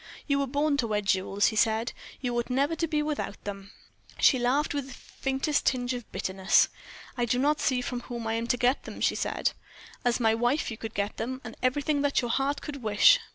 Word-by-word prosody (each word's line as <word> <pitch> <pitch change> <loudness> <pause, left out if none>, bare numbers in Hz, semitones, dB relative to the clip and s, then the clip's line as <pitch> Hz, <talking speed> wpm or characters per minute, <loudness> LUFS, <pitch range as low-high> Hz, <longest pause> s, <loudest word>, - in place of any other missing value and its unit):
"You 280 -1 +1
were 280 - 0
born 285 +2 +1
to 240 - 0
wear 210 -1 0
jewels," 195 0 +2
he 220 - -6
said. 220 +2 +2 0.3
"You 245 -2 -2
ought 240 +1 -1
never 280 +5 +1
to 330 +1 -1
be 300 -1 0
without 295 -9 -4
them." 200 -1 -6 0.5
She 260 - +5
laughed 265 +6 +1
with 285 -2 -3
the 265 - -9
faintest 270 +2 -2
tinge 250 -1 +1
of 245 -2 -7
bitterness. 190 0 +2 0.5
"I 245 -2 0
do 240 +1 +1
not 295 +4 +2
see 255 -2 +1
from 250 0 -3
whom 240 -1 -6
I 220 - -1
am 230 +1 -2
to 245 - +1
get 250 +3 +1
them," - - -8
she - - +2
said. - - -1 0.5
"As 245 0 +2
my 225 -2 +3
wife 240 +5 +1
you 225 - -6
could 225 -1 -7
get 200 +1 -2
them, 255 +3 -3
and 220 - -8
everything 285 +3 +1
that 285 -1 +2
your 240 -2 -1
heart 275 +3 0
could 280 -2 -6
wish. 220 - +6
250 Hz, 225 wpm, -28 LUFS, 225-280 Hz, 0.5 s, wish